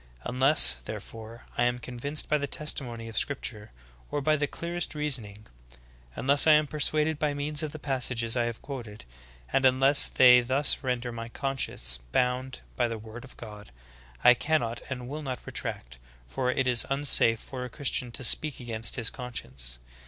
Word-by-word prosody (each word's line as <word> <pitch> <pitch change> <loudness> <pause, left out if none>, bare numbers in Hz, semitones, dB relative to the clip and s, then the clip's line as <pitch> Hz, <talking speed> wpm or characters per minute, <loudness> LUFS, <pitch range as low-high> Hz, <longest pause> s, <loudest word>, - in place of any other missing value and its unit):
Unless, 130 - +5
therefore, 115 +1 -9 0.2
I 120 - +3
am 120 0 0
convinced 130 +5 -2
by 150 - +1
the 140 - -3
testimony 120 -6 -3
of 110 -1 -2
scripture, 110 -7 -4 0.4
or - - -2
by 155 +2 +2
the 145 -1 -1
clearest 170 0 -4
reasoning 115 -9 -1 0.4
— - - -28
unless 140 +4 +3
I 155 - +8
am 150 0 +4
persuaded 150 +1 0
by 150 -1 -1
means 145 +1 -1
of 155 -2 -4
the 155 - -8
passages 125 -5 -1
I 120 -1 +1
have 120 -1 -6
quoted, 120 - -8 0.2
— - - -24
and 135 - +2
unless 135 +2 +5
they 125 -1 +6
thus 130 +4 +3
render 125 -2 -3
my 115 0 -7
conscience 115 - -1
bound 130 +1 -1
by 120 - +1
the 115 -1 -5
word 110 +2 -11
of 130 - -15
God, 105 - -11 0.5
I 125 - +8
cannot 120 -3 -1
and 125 -2 -6
will 150 +4 -6
not 130 -4 -6
retract, - - -6 0.3
for 65 - -2
it 130 +1 0
is 125 -2 +3
unsafe 135 -5 +2
for 130 0 -8
a 125 - -6
Christian 125 -1 -1
to 130 - -5
speak 150 +5 +4
against 115 -2 -2
his 115 -4 +1
conscience. 65 - -3
125 Hz, 180 wpm, -27 LUFS, 115-140 Hz, 0.5 s, I